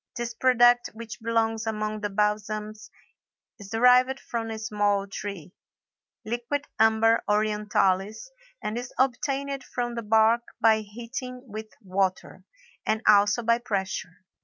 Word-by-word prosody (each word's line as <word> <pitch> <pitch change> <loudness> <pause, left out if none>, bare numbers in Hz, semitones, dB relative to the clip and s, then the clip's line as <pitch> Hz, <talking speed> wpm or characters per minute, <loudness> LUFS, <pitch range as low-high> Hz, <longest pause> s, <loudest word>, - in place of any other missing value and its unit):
This 240 0 -4
product 245 0 +4
which 225 -1 -8
belongs 225 -1 0
among 215 -1 -2
the 205 - -2
balsams 210 +1 -2 0.7
is 200 -1 -10
derived 250 +4 +4
from 230 -1 -4
a 220 - -4
small 205 -2 0
tree, 195 -3 -7 0.7
Liquidambar 230 -2 +1
orientalis, 210 - 0 0.3
and 215 +3 -2
is 245 0 -7
obtained 275 +1 -1
from 240 -1 -3
the 235 - -4
bark 220 +2 +4 0.2
by 220 -1 +5
heating 240 +4 -7
with 220 -2 -7 0.2
water, 190 0 -2 0.4
and 220 +2 -1
also 205 +3 +5
by 230 +1 +3
pressure. 190 -5 -4
220 Hz, 120 wpm, -26 LUFS, 210-240 Hz, 0.7 s, by